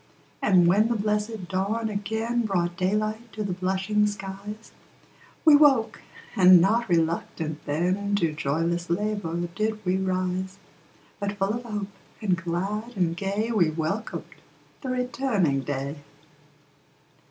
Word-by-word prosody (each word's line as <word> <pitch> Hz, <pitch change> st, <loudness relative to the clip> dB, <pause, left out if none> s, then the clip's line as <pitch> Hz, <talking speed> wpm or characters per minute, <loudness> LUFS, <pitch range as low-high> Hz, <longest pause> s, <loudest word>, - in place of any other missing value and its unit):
And 185 Hz, -4 st, +5 dB
when 200 Hz, +6 st, +4 dB
the 235 Hz, -, 0 dB
blessed 210 Hz, -1 st, -1 dB
dawn 200 Hz, +5 st, -1 dB
again 220 Hz, +3 st, -1 dB
Brought 175 Hz, -3 st, 0 dB
daylight 215 Hz, +5 st, -1 dB
to 215 Hz, +1 st, -3 dB
the 195 Hz, -3 st, -2 dB
blushing 190 Hz, +3 st, +1 dB
skies, 205 Hz, +2 st, -7 dB, 0.7 s
We 310 Hz, -2 st, +9 dB
woke, 270 Hz, -7 st, +4 dB, 0.3 s
and 185 Hz, -1 st, +8 dB
not 215 Hz, +5 st, +2 dB
RELUCTANT 165 Hz, -2 st, -1 dB
then, 185 Hz, +7 st, 0 dB
To 170 Hz, -6 st, +1 dB
joyless 165 Hz, +4 st, -1 dB
LABOUR 175 Hz, -3 st, -1 dB
did 215 Hz, +1 st, -2 dB
we 180 Hz, +1 st, +2 dB
rise; 185 Hz, 0 st, -2 dB, 0.6 s
But 200 Hz, -1 st, -2 dB
full 195 Hz, +1 st, +1 dB
of 240 Hz, +1 st, -4 dB
hope, 210 Hz, -3 st, -3 dB, 0.3 s
and 195 Hz, -5 st, +1 dB
glad 195 Hz, +7 st, -3 dB
and 170 Hz, -3 st, +1 dB
gay, 200 Hz, +5 st, -1 dB
We 185 Hz, -8 st, +3 dB
welcomed 160 Hz, +7 st, -3 dB, 0.6 s
the 260 Hz, -, -5 dB
returning 250 Hz, -, 0 dB
day. 140 Hz, +1 st, -4 dB
195 Hz, 130 wpm, -26 LUFS, 175-215 Hz, 0.7 s, We